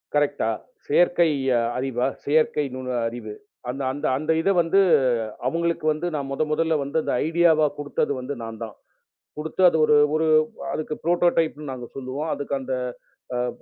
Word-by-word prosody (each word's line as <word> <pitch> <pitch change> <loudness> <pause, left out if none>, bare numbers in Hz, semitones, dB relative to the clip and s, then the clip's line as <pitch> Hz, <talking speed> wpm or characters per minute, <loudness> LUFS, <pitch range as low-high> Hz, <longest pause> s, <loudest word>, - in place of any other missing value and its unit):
Correct 145 -3 +1
ஆ, - - +1 0.4
செயற்கை 175 +2 +4 0.5
அறிவா? 125 -1 -1 0.2
செயற்கை 150 0 +2
நுண்ணறிவு 120 -4 -3 0.4
அந்த 135 +2 -4
அந்த 145 +3 -5
அந்த 155 +3 -1
இதை 195 - +2
வந்து 170 +4 +2 0.7
அவர்களுக்கு 170 +1 -1
வந்து 170 +3 -3
நான் 140 -2 -3
முதல் 150 +2 -1
முதலில் 160 -1 +1
வந்து 140 +4 -3
அந்த - - -2 0.2
ஐடியா 170 +1 +4
வாக 150 -2 +2
கொடுத்தது 145 0 -1
வந்து 130 +3 -4
நான் 115 0 -7
தான்! 110 -2 -8 0.6
கொடுத்து 160 +4 -2
அது 160 - +1
ஒரு 150 -1 +5 0.2
ஒரு 160 +1 +1 0.5
அதற்கு 155 0 -3
ப்ரோடோடைப் 170 -2 +2
ன்னு 150 -3 -6
நாங்கள் 125 -2 -8
சொல்லுவோம். 135 +4 -4
அதற்கு 140 -1 -4
அந்த, 130 0 -3 0.6
அ - - -1
அ 125 0 0
145 Hz, 165 wpm, -24 LUFS, 130-160 Hz, 0.7 s, ஒரு